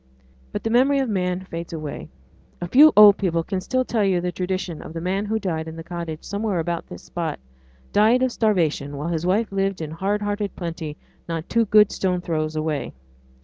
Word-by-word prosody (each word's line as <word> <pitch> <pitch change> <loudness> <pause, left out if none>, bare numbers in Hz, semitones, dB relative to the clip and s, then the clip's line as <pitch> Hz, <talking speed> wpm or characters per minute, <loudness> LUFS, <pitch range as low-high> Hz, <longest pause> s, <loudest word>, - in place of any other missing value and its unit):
But - - -4
the 225 - -1
memory 265 +4 +4
of 265 -3 0
man 180 -2 -1
fades 170 -2 -7
away. 155 -3 -6 0.5
A 175 - -4
few 295 - +7
old 210 -1 +9
people 170 -4 0
can 190 +1 -3
still 255 +6 0
tell 225 -4 0
you 190 -3 +2
the 180 +1 -2
tradition 180 -2 -3
of - - -9
the 165 - -4
man 190 +4 -1
who 220 +1 0
died 165 -6 -3
in 160 0 -8
a 165 - -7
cottage 170 -2 -6
somewhere 205 -1 -2
about 170 +1 -2
this - - -10
spot, 170 -2 -4 0.6
died 225 +5 +4
of 260 - +1
starvation 160 -11 0
while 150 +4 -3
his 170 0 -2
wife 205 +4 +1
lived 195 -1 -1
in 155 -2 -5
hard 200 +5 -1
hearted 205 -1 -2
plenty 165 -3 -5 0.3
not 165 0 -3
two 230 0 +2
good 210 0 +5
stone 180 -2 0
throws 155 -3 -2
away. 155 -2 -2
180 Hz, 205 wpm, -23 LUFS, 165-210 Hz, 0.6 s, old